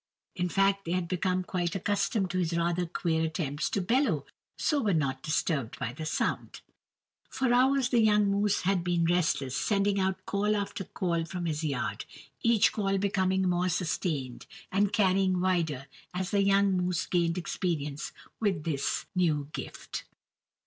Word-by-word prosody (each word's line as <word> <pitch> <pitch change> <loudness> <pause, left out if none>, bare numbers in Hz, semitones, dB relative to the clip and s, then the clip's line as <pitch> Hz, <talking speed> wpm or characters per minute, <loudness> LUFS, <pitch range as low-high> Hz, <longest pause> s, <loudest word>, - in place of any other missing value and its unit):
In 180 -1 -1
fact 195 +1 +2
they 170 - -1
had 180 -1 -1
become 185 +1 0
quite 180 0 -2
accustomed 200 0 0
to 185 - -1
his 170 -1 0
rather 170 +1 0
queer 165 -1 0
attempts 155 -2 -2
to 200 - 0
bellow, 205 - +1 0.3
so 295 -2 +1
were 205 -7 +2
not 135 -4 0
disturbed 155 -4 -1
by 125 -3 -3
the 155 +4 -5
sound. - - -2 0.7
For 260 -2 +1
hours 260 +1 +4
the 240 -3 +4
young 210 -1 +4
moose 205 0 +1
had 185 -1 +1
been 175 -1 +1
restless, 160 -6 +1
sending 200 +2 +1
out 190 0 -1
call 210 +1 +1
after 200 -1 -3
call 170 -2 -1
from 180 0 -5
his 155 -1 -2
yard, 145 -3 -2 0.4
each 230 -3 +4
call 195 -2 0
becoming 190 -1 +1
more 180 +1 +1
sustained 155 -7 -2 0.2
and 200 +1 +2
carrying 190 -2 +2
wider 170 -7 0 0.3
as 185 +1 -2
the 200 -2 +3
young 200 0 +4
moose 180 -1 0
gained 170 -1 +1
experience 155 -5 -3 0.3
with 190 -8 0
his 140 -4 -1
new 155 -6 +1
gift. - - -6
180 Hz, 160 wpm, -29 LUFS, 165-200 Hz, 0.7 s, hours